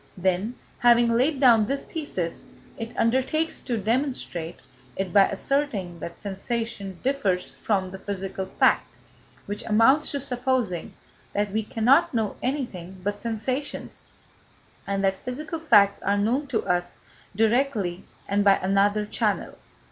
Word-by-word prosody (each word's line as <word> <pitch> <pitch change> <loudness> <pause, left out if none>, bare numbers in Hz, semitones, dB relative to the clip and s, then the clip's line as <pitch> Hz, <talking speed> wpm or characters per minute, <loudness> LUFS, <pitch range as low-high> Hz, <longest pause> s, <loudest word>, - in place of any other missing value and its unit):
Then, 190 +6 0 0.2
having 240 -1 +5
laid 270 +4 +2
down 230 -6 +6
this 275 +2 -2
thesis, 190 - -4 0.3
it 225 0 -7
undertakes 265 +7 +1
to 240 -3 -2
demonstrate 220 - -2 0.4
it 190 -2 -3
by 200 -1 +7
asserting 200 -6 -2
that 170 +2 -7
sensation 200 -1 -4
differs 210 -10 0
from 190 -4 0
the 190 - -8
physical 195 -1 -4
fact, - - +2 0.5
which 205 +1 -4
amounts 230 +8 +4
to 280 - -2
supposing 250 -8 -1 0.4
that 205 0 0
we 220 +2 0
cannot 235 +5 +3
know 220 -3 0
anything 200 - -4
but 205 +1 -2
sensations, 235 +6 -3 0.8
and 195 0 -1
that 190 0 0
physical 305 +6 -4
facts 210 -11 +4
are 200 +1 +1
known 245 +8 +1
to 235 -5 -1
us 175 0 -1 0.4
directly 220 -5 +1 0.2
and 200 +1 +2
by 200 -1 +6
another 200 +2 +2
channel. 210 - -1
215 Hz, 135 wpm, -25 LUFS, 195-255 Hz, 0.8 s, by